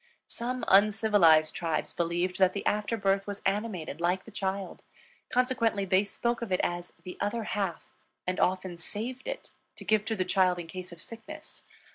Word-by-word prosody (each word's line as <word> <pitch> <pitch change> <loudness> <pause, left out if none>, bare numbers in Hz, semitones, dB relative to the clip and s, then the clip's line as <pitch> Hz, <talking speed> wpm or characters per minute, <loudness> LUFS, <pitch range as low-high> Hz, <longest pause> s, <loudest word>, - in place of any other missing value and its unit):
Some 250 +1 -3
uncivilized 200 -6 +5
tribes 165 -2 -2
believed 175 +2 -1
that 185 -1 +5
the 200 - -4
after 210 +2 +1
birth 195 -1 +1
was 200 0 -4
animated 195 -6 -1
like 180 +2 +1
the 225 - -11
child; 195 -1 -3 0.5
consequently 235 -5 +1
they 190 +1 +4
spoke 235 +3 -1
of 230 -4 -4
it 185 - +2
as 175 0 -2
"the 180 - -8
other 205 +3 0
half," 195 -5 -3 0.3
and 185 +1 -1
often 185 -1 +1
saved 235 - -5
it - - -5 0.2
to - - -11
give 215 -1 +3
to 225 - -1
the 185 -3 0
child 185 -1 +3
in 175 - -5
case 180 +2 -7
of 170 - -10
sickness. 305 - -10
195 Hz, 175 wpm, -29 LUFS, 180-220 Hz, 0.5 s, uncivilized